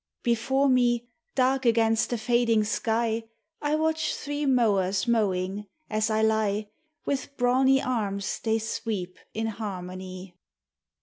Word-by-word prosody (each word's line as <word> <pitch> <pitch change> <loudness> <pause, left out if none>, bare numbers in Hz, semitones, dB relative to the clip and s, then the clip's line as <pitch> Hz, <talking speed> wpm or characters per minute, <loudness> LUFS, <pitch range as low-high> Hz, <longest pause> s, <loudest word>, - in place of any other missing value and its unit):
Before 245 +4 +2
me, 240 -2 +2 0.3
dark 265 +1 +2
against 225 -2 +3
the 240 - -1
fading 230 -1 +2
sky, 225 +1 0 0.4
I 295 +1 +1
watch 315 0 0
three 290 0 -3
mowers 200 -7 +2
mowing, 200 -3 0 0.2
as 215 +1 +1
I 220 0 +1
lie: 215 -1 +1 0.4
With 280 0 -3
brawny 260 +2 +4
arms 200 -6 -2
they 225 -1 +1
sweep 210 -4 -4 0.2
in 225 +1 -1
harmony. 185 -3 -6
225 Hz, 120 wpm, -27 LUFS, 205-250 Hz, 0.4 s, brawny